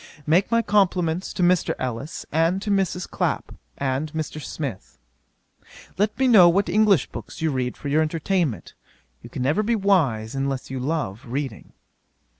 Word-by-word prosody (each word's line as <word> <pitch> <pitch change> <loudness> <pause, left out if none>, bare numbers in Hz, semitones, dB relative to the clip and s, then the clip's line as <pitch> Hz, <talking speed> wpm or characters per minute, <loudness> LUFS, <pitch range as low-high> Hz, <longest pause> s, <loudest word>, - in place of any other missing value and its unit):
'Make 170 +6 +3
my 230 0 +2
compliments 185 -4 +1
to 180 - -1
Mr. 180 0 +2
Ellis, 130 +5 -5
and 165 +4 +2
to 210 - -2
Mrs. 190 -2 0
Clapp, - - -2 0.2
and 140 +2 -2
Mr. 155 -1 -4
Smith. 105 - -6 1.0
'Let 210 +2 0
me 265 - +2
know 195 -8 +8
what 190 +2 +1
English 205 -4 +4
books 115 - -9
you 160 -1 0
read 125 -2 -2
for - - -7
your 150 +3 +2
entertainment. 160 - -1 0.5
You - - -11
can 125 - -4
never 150 +10 +2
be 230 +2 +1
wise 150 - +1
unless 135 -1 -3
you 130 - -3
love 130 -6 -3
reading. 130 -2 -5
160 Hz, 160 wpm, -23 LUFS, 135-190 Hz, 1.0 s, know